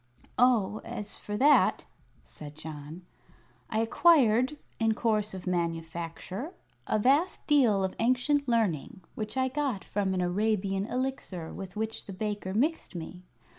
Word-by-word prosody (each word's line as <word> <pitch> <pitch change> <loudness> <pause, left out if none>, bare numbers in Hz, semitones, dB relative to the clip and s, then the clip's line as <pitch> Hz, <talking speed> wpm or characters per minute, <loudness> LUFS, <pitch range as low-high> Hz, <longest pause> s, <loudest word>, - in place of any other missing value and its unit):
"Oh, 230 -5 +3
as 210 0 -6
for 210 0 -5
that," 290 +5 +4 0.4
said 150 -1 -11
John, 155 +2 -8 0.7
"I 220 - +1
acquired, 255 0 +4 0.2
in 225 -1 +2
course 215 -3 0
of 185 - -8
manufacture, 170 - -3 0.3
a - - +2
vast 280 - +2
deal 240 -10 +4
of 190 - -1
ancient 255 +4 +2
learning, 220 - 0
which 215 +3 -5
I 260 0 +2
got 265 -6 -2
from 195 -2 -1
an 180 - 0
Arabian 195 +1 0
Elixir 250 -11 -3
with 190 -2 -8
which 220 +1 -3
the 195 - -6
baker 205 -1 -3
mixed 265 - 0
me. 175 +2 -7
210 Hz, 135 wpm, -29 LUFS, 185-250 Hz, 0.7 s, that